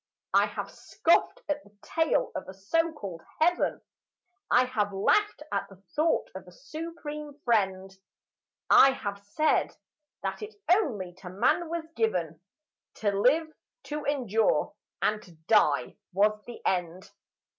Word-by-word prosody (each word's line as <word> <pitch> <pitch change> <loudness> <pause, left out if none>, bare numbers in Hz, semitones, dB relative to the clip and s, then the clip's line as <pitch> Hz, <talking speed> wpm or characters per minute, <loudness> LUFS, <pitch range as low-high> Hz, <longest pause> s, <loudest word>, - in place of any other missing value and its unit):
I - - +5
have - - -6
scoffed - - +1
at 295 0 -2
the 205 0 -22
tale 325 -1 +1
of - - -5
a 190 - -9
so 330 +13 +1
called 195 - -7 0.2
heaven; 350 +3 +2 0.7
I 250 +1 +5
have 215 -5 -1
laughed 300 - +2
at - - -2
the 195 - -13 0.2
thought 320 +2 +2
of 190 -1 -9
a - - -12
Supreme 300 - -7
Friend; 190 -4 +1 0.8
I 270 0 +8
have 200 -5 -5
said 305 +10 +1 0.5
that - - -3
it 430 +1 -7 0.2
only 220 - +1
to 185 - -8
man 245 - +1
was 335 -1 -3
given 180 -8 -1 0.5
To 205 -2 0
live, 290 +11 +2 0.3
to 300 0 -5
endure; 240 -7 +1 0.3
and 210 0 +1
to 175 - -16
die 145 - +3
was 210 +2 +2
the 240 - -10
end. 180 0 -1
225 Hz, 140 wpm, -28 LUFS, 195-305 Hz, 0.8 s, I